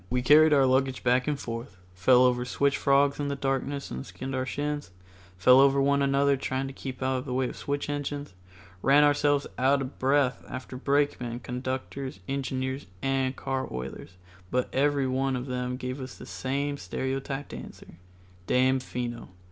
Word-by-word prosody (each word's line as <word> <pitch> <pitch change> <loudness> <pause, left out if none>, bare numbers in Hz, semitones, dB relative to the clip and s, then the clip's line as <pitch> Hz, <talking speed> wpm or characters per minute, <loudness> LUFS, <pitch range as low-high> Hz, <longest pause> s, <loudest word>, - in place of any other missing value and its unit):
We 125 0 0
carried 155 +4 +7
our 140 -2 +5
luggage 130 0 +1
back 125 +2 +2
and 145 -2 -1
forth, 115 -4 -6 0.2
fell 125 +7 +5
over 125 -1 +3
switch 140 +3 +1
frogs 140 +1 +3
in 145 - -1
the 140 - -1
darkness 140 +1 -2
and 65 - -4
skinned 135 +1 -7
our 130 0 -1
shins, 145 +2 -3 0.5
fell 125 +8 +7
over 140 0 +5
one 140 +1 +3
another 140 0 +3
trying 130 0 -2
to 135 - -6
keep 130 -1 -6
out 130 -1 0
the 125 -2 -3
way 130 0 +1
of - - -8
switch 145 0 -3
engines, 145 -4 -4 0.5
ran 140 +5 +5
ourselves 145 -1 +3
out 135 +2 +4
of 135 0 -6
breath 135 -1 +2
after 130 0 -7
brakemen, 135 -3 0
conductors, 130 -1 -4
engineers 130 -2 -3 0.2
and 135 -1 0
car 135 0 -3
oilers, 65 +8 -7 0.3
but 125 +3 -1
everyone 135 -1 +1
of 125 0 -3
them 125 -1 -3
gave 130 +1 -5
us 130 - -8
the - - -10
same 140 +2 -2
stereotyped 135 +1 -4
answer, 85 - -10 0.5
"Damfino." 125 -2 0
135 Hz, 165 wpm, -27 LUFS, 125-140 Hz, 0.5 s, carried